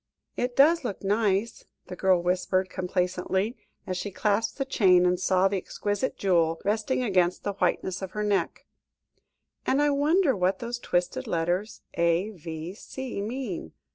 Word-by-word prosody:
"It 245 0 -2
does 315 +3 +5
look 205 -6 -4
nice," 205 +1 0 0.2
the 180 - -7
girl 185 -2 +2
whispered 185 +1 0
complacently, 185 +4 -1 0.3
as 185 -2 -3
she 205 - -3
clasped 210 +3 0
the 270 - -1
chain, 185 -9 +4
and 180 0 +2
saw 185 0 +3
the 195 0 -1
exquisite 205 +6 -3
jewel 165 -4 +2
resting 220 +5 0
against 185 -5 +1
the 205 - -2
whiteness 190 0 -1
of 190 - -4
her 210 - -2
neck, 205 -2 -1 1.0
"and 270 - +1
I 295 0 +3
wonder 295 +1 +3
what 185 0 +1
those 240 +2 -5
twisted 175 -5 -1
letters 175 +6 -1
A.V.C. 175 - -3
mean? 210 - -5
195 Hz, 145 wpm, -27 LUFS, 180-225 Hz, 1.0 s, does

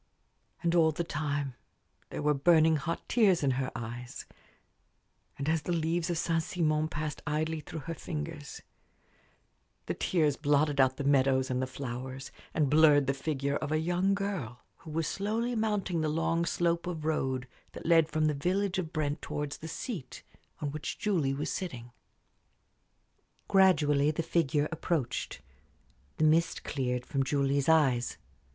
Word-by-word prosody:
And 170 0 +2
all 165 -2 +5
the 165 +3 -2
time 145 -4 -2 0.6
there - - -5
were 150 0 +3
burning 160 +2 +5
hot 165 +4 -4
tears 195 -9 +3
in 135 - +3
her 130 0 -1
eyes; 120 +2 -6 1.1
and 140 - -4
as 160 0 +2
the 175 - -4
leaves 165 +1 0
of 170 - 0
Saint 165 0 +1
Simon 155 -2 0
passed 150 -2 -4
idly 155 +1 -1
through 155 +1 -7
her 165 +5 -5
fingers, 155 -2 -6 1.2
the - - -2
tears 155 -6 +1
blotted 145 -1 +2
out 130 0 +3
the - - -3
meadows 135 -2 +3
and 125 0 0
the 130 - -1
flowers, 130 0 -6 0.2
and 150 -3 +1
blurred 150 -1 +6
the 135 - +1
figure 140 0 -1
of 145 - -4
a 155 - +2
young 175 +4 +1
girl 185 - -4
who 160 - -12
was 160 +1 -1
slowly 225 +5 -1
mounting 210 -6 0
the 155 - 0
long 165 +2 +1
slope 170 0 0
of 160 -4 -4
road 130 -5 -1 0.3
that - - -9
led 165 -1 +5
from 155 0 +1
the 155 - +2
village 185 +6 0
of 165 -4 -4
Brent 150 -1 -2
towards 145 -1 -4
the 160 - -7
seat 165 - -6 0.4
on 145 -2 -2
which 155 +1 -5
Julie 160 -10 0
was 145 - -3
sitting. 125 -11 -5 1.6
Gradually 150 -7 +4
the 155 +2 -1
figure 155 -3 +1
approached. 160 - -2 0.8
The - - +1
mist 165 +2 +3
cleared 125 -3 -2
from 135 - -1
Julie's 140 +1 +1
eyes. 135 -7 +3
155 Hz, 160 wpm, -30 LUFS, 140-165 Hz, 1.6 s, blurred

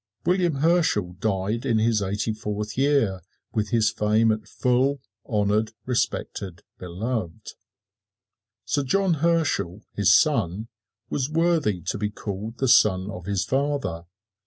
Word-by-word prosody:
William 175 -2 +2
Herschel 145 - +2
died 105 +2 -1
in 120 -5 +1
his 110 -1 +2
eighty 100 +3 -1
fourth 105 0 -4
year, 135 -9 +2 0.3
with 105 -1 -1
his 115 -1 +2
fame 110 +1 +2
at 110 0 -3
full, 130 +3 +1 0.3
honored, 105 0 +1
respected, 100 -7 -2 0.2
beloved. 90 +1 -4 1.1
Sir 145 - 0
John 185 +7 +1
Herschel, 160 - 0
his 100 -2 +3
son, 110 - +2 0.4
was 135 0 -1
worthy 160 - +1
to 100 - -3
be 105 0 -1
called 105 +2 -6
the 135 - 0
son 95 -4 +4
of 90 -2 -8
his 100 -1 0
father. 130 - -1
110 Hz, 130 wpm, -24 LUFS, 100-135 Hz, 1.1 s, son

